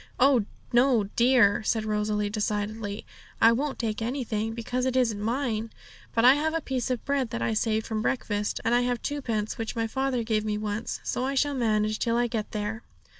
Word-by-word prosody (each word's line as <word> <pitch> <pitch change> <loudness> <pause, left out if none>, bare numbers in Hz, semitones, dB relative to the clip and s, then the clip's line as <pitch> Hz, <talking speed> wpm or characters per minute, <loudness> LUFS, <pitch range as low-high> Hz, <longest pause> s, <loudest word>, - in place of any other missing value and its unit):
'Oh 255 -4 +5 0.3
no, 240 -2 +4
dear!' 235 -5 +4
said 220 0 0
Rosalie 210 -1 0
decidedly; 210 0 -3 0.3
'I 225 - +7
won't 270 +4 -1
take 220 -2 -2
anything, 225 -3 -2
because 250 +2 -2
it 260 - -1
isn't 230 -5 +1
mine. 230 -1 -1 0.5
But 230 +1 +4
I 255 - +9
have 315 +3 0
a - - +2
piece 260 -5 -3
of 250 -2 -2
bread 280 -4 0
that 115 - -4
I 115 -1 0
saved 220 - 0
from 220 -1 -2
breakfast, 210 -4 -1
and 230 - +2
I 245 - +4
have 245 -1 -1
twopence 235 -7 -2
which 225 +1 -3
my 230 -1 0
father 265 +1 -1
gave 220 -1 0
me 210 -1 -1
once, 215 +2 -3
so 250 - -2
I 270 +1 -1
shall 290 +2 +2
manage 215 -4 +1
till 235 -1 +1
I 240 - +2
get 225 -3 -3
there.' 210 +2 -3
230 Hz, 200 wpm, -27 LUFS, 215-255 Hz, 0.5 s, I